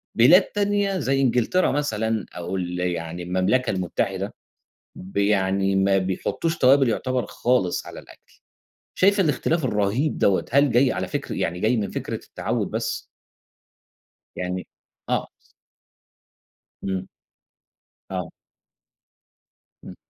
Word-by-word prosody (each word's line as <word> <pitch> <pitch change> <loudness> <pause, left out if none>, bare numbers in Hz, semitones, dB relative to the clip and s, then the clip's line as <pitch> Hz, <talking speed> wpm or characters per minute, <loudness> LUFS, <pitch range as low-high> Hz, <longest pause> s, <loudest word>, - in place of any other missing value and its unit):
بلاد 145 - +7
تانية 205 -2 0
زي 135 0 +1
إنجلترا 125 +8 +2
مثلًا، 110 -7 -1
أو 90 +2 -4
ال 90 -1 -3
يعني 85 -1 -3
المملكة 95 +8 +1
المتحدة 95 +2 -2 0.6
ب 95 +2 -8
يعني 100 -1 +2
ما 95 0 +3
بيحطّوش 95 - -1
توابل 135 0 +5
يُعتَبَر 130 +2 -1
خالص 120 -8 0
على - - -9
الأكل، - - -18 0.6
شايفة 200 +1 +4
الاختلاف 155 +1 0
الرهيب 115 +6 0
دوَّة، 95 -2 +2
هل 140 +1 +4
جاي 125 +2 +4
على - - -3
فكر - - -4
يعني 90 +1 -2
جاي 115 +3 +2
من 105 -3 -2
فكرة - - -4
التعوّد - - -3
بس؟ - - -2 1.3
يعني 90 0 -4 0.4
آه. - - 0 1.6
إمم. 95 -1 -3 1.0
آه. 90 -3 -3 1.5
إمم. - - -10
105 Hz, 115 wpm, -24 LUFS, 95-135 Hz, 1.6 s, بلاد